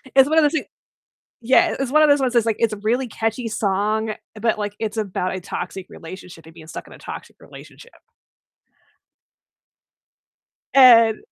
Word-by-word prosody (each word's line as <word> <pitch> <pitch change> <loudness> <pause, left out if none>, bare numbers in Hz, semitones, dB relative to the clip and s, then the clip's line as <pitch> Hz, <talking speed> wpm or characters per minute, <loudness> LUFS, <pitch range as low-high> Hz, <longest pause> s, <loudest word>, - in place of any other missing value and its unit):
It's 270 0 +6
one 315 - +1
of 320 - +6
those 295 - +3
thi 315 - -1 0.8
yeah, 255 +3 +3
it's 270 -1 -3
one 305 +1 +5
of 305 - +5
those 285 0 +5
ones 260 -3 -1
that's, 235 -2 +2
like, 225 -2 0
it's 230 -2 +1
a 215 - -5
really 235 +5 -1
catchy 225 +2 -3
song, 215 +1 -1 0.3
but, 225 -1 0
like, 205 -1 -4
it's 220 0 -4
about 190 -3 -3
a - - -6
toxic 180 +1 -6
relationship 170 -1 -12
and 160 - -15
being 160 -2 -14
stuck - - -9
in - - -15
a - - -14
toxic - - -10
relationship. 480 - -15 2.8
And 230 -5 +7
220 Hz, 175 wpm, -21 LUFS, 200-255 Hz, 2.8 s, And